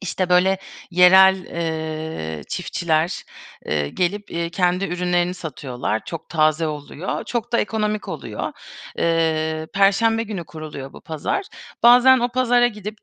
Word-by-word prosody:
işte, 185 -1 -2
böyle, 185 +2 +3 0.3
yerel, 190 +1 +6
eee, 160 - -4
çiftçiler, 170 -1 -1 0.4
eee, 75 -1 -1
gelip, 200 - -2
iii, 170 0 -3
kendi 180 +2 +1
ürünlerini 180 -1 0
satıyorlar, 130 -9 -4
çok 165 - -7
taze 155 0 +2
oluyor, 150 +3 -5
çok 240 0 -4
da 235 - +3
ekonomik 215 -1 -1
oluyor. - - -5 0.5
Eee, 160 -1 0
perşembe 225 +3 +3
günü 205 -6 -5
kuruluyor 155 -4 -8
bu - - -12
pazar. 160 - -3 0.4
Bazen 250 +2 +7
o 240 - 0
pazara 245 -1 +3
gidip 210 -2 -6
180 Hz, 130 wpm, -21 LUFS, 160-210 Hz, 0.5 s, Bazen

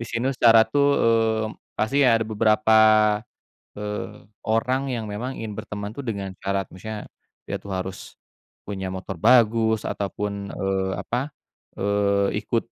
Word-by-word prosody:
Di - - -4
sini 125 +4 -1
syarat 115 -3 +5
tuh, 145 0 +4
eee, 115 -1 +2 0.3
pasti 135 +7 +1
ada 115 -4 +4
beberapa, 110 0 +3 1.0
eee, 105 -1 -6 0.2
orang 130 +4 0
yang 110 -3 -4
memang 120 +6 -4
ingin 105 -2 -6
berteman 105 -1 -5
tuh 140 - -6
dengan 100 -4 -3
syarat. 100 0 -2
Maksudnya 105 +3 -8 0.4
dia - - -2
tuh 100 - -8
harus 95 0 -5 0.5
punya 95 -2 -4
motor 95 0 -6
bagus 110 +1 +4
ataupun, 100 0 -4
eee, 95 0 -1
apa, 130 +5 -3 0.4
eee, 100 0 +1
ikut 115 - +1
110 Hz, 135 wpm, -24 LUFS, 100-115 Hz, 1.0 s, syarat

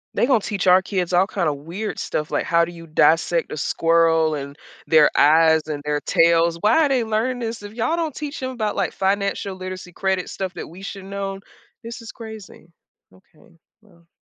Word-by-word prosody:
They're - - +3
gonna 250 -3 +3
teach 200 -1 -3
our 185 0 +6
kids 185 -2 -3
all 180 +2 +4
kinda 170 -7 -1
weird 170 +10 -6
stuff, 150 0 -3
like - - 0
how 170 0 +3
do 175 - -9
you 165 -1 -12
dissect 165 +2 +2
a - - -5
squirrel 165 0 +2
and 140 -1 -6 0.3
their 155 -2 +6
eyes 160 +1 +5
and 145 -2 -5
their 150 0 -1
tails- 170 0 +3
why 320 +9 +4
are - - 0
they 255 -4 +2
learning 225 +3 -1
this? 230 -2 -4
If 205 0 -9
y'all 245 +9 0
don't 320 -5 -3
teach 300 0 -5
them 260 - -3
about, 220 -4 -2
like, - - -1
financial 195 0 -1
literacy, 185 -1 -7
credit 190 -1 -1
stuff 190 -1 -5
that - - -6
we 175 +4 -13
should 195 0 -7
known? 195 0 -5 0.4
This 230 +1 -8
is 225 - -9
crazy. 220 -6 -11 0.4
Okay, 175 -2 -24 0.3
well 175 -6 -24
185 Hz, 200 wpm, -22 LUFS, 165-215 Hz, 0.4 s, our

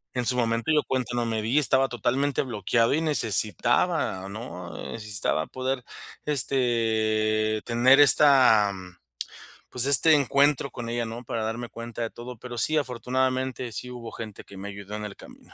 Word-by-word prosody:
En 125 -1 -1
su 125 - 0
momento 115 +3 0
yo 150 - +4
cuenta 130 -3 -2
no 120 -1 -1
me 110 -1 -2
di, 125 +7 +2
estaba 135 -1 +3
totalmente 130 +3 0
bloqueado 115 +1 0
y 160 - 0
necesitaba, 110 -8 0
¿no? 90 -5 -8 0.2
Necesitaba 105 -7 -1
poder, 130 -1 -3 0.4
este, 110 -5 +1
tener 125 +4 +4
esta, 130 -7 +6 1.0
pues, 125 +1 -1
este 140 +3 +6
encuentro 140 0 +2
con 120 -2 -7
ella, 120 0 -2
¿no? 115 +2 -7
Para 115 -2 -4
darme 115 +2 -4
cuenta 115 0 -8
de 115 - -2
todo. 120 +1 -9
Pero 120 +1 -9
sí, 155 +7 +1
afortunadamente, 130 -1 -2
sí 125 +4 -6
hubo 115 -2 -8
gente 110 -3 -9
que 100 - -14
me 100 +1 -7
ayudó 100 +1 -8
en 105 - -5
el 100 -2 -8
camino. - - -16
120 Hz, 160 wpm, -25 LUFS, 110-130 Hz, 1.0 s, esta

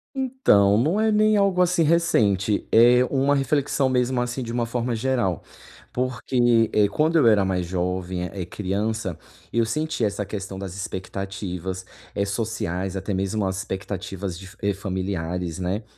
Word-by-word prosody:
Então, 250 - +3
não 155 - +2
é 220 0 +3
nem 215 0 +4
algo, 195 -2 +3
assim, 175 -2 +3
recente. 110 - +2
É 120 +2 +6
uma 140 +2 +2
reflexão, 140 0 +1
mesmo 125 0 +1
assim, 125 +2 -3
de 115 - -5
uma 120 0 0
forma 120 0 -2
geral. 115 - 0 0.5
Porque, 120 -2 +2
eh, 105 -1 +4
quando 155 +10 +1
eu 140 -7 +5
era 105 -3 +5
mais 95 -2 -1
jovem, 90 0 -2
eh, 95 -3 -5
criança, 100 0 -2 0.3
eu 115 -1 +2
sentia 150 +1 -1
essa 105 0 -3
questão 95 -1 -6
das 95 -2 -6
expectativas, 95 -1 -5 0.3
eh, 100 - +1
sociais, 100 -3 -3
até 95 +2 -3
mesmo 95 +2 -1
as 95 0 -2
expectativas 95 -1 -5
de 95 +1 -10
fa 95 +3 -16
eh, 100 0 +1
familiares, 90 -3 -3
né, 95 +4 -2
105 Hz, 160 wpm, -24 LUFS, 95-125 Hz, 0.5 s, É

